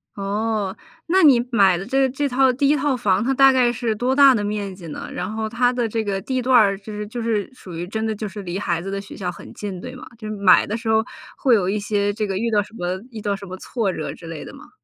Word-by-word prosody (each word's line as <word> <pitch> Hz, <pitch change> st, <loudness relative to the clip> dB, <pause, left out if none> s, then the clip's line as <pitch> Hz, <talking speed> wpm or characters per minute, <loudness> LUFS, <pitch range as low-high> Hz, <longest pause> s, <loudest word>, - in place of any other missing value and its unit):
哦， 205 Hz, 0 st, -2 dB, 0.3 s
那 375 Hz, +3 st, +4 dB
你 250 Hz, -5 st, +6 dB
买 195 Hz, -6 st, +4 dB
的 195 Hz, -, -6 dB
这 270 Hz, +3 st, +2 dB
这 280 Hz, +3 st, -1 dB
套 260 Hz, +1 st, +4 dB
第 275 Hz, +2 st, +2 dB
1 295 Hz, -, +4 dB
套 285 Hz, -2 st, +1 dB
房， 210 Hz, -2 st, +1 dB
它 265 Hz, +3 st, +1 dB
大 270 Hz, 0 st, +6 dB
概 255 Hz, -2 st, +3 dB
是 235 Hz, -2 st, -1 dB
多 250 Hz, +5 st, 0 dB
大 275 Hz, -2 st, +8 dB
的 215 Hz, -, 0 dB
面 205 Hz, -2 st, -3 dB
积 180 Hz, -3 st, -11 dB
呢？ 150 Hz, -, -7 dB
然 -, -, -4 dB
后 220 Hz, 0 st, -3 dB
它 245 Hz, +1 st, +2 dB
的 240 Hz, -3 st, -1 dB
这 220 Hz, 0 st, -2 dB
个 195 Hz, -1 st, -2 dB
地 255 Hz, +4 st, -2 dB
段 250 Hz, 0 st, +4 dB
儿 200 Hz, -4 st, +4 dB
就 210 Hz, +1 st, -9 dB
是 210 Hz, 0 st, -4 dB
就 235 Hz, +3 st, -6 dB
是 220 Hz, -2 st, -1 dB
属 185 Hz, -8 st, -11 dB
于 170 Hz, +1 st, -4 dB
真 220 Hz, +4 st, -3 dB
的 220 Hz, -1 st, -1 dB
就 215 Hz, -, -5 dB
是 205 Hz, 0 st, -6 dB
离 180 Hz, +1 st, -4 dB
孩 170 Hz, -4 st, -1 dB
子 195 Hz, -, -6 dB
的 195 Hz, 0 st, -3 dB
学 195 Hz, -, -11 dB
校 185 Hz, -2 st, -3 dB
很 175 Hz, -, -10 dB
近， 200 Hz, -3 st, -6 dB
对 250 Hz, -, -7 dB
吗？ 255 Hz, -, -10 dB
就 215 Hz, -2 st, -7 dB
是 215 Hz, -, -3 dB
买 200 Hz, -3 st, +5 dB
的 215 Hz, +3 st, -3 dB
时 225 Hz, -, -8 dB
候 220 Hz, 0 st, +3 dB, 0.3 s
会 260 Hz, -4 st, +3 dB
有 190 Hz, -5 st, +3 dB
一 205 Hz, +2 st, 0 dB
些 205 Hz, 0 st, 0 dB
这 215 Hz, +1 st, -2 dB
个 195 Hz, -2 st, -2 dB
遇 230 Hz, +3 st, 0 dB
到 210 Hz, -2 st, +2 dB
什 210 Hz, -, -18 dB
么 180 Hz, -2 st, -2 dB
遇 225 Hz, -, -7 dB
到 205 Hz, -1 st, -1 dB
什 200 Hz, 0 st, -9 dB
么 185 Hz, 0 st, -7 dB
挫 215 Hz, 0 st, -2 dB
折 -, -, -4 dB
之 175 Hz, -, -13 dB
类 165 Hz, -2 st, -7 dB
的 -, -, -10 dB
吗？ 290 Hz, +2 st, -14 dB
215 Hz, 305 characters per minute, -22 LUFS, 195-245 Hz, 0.3 s, 大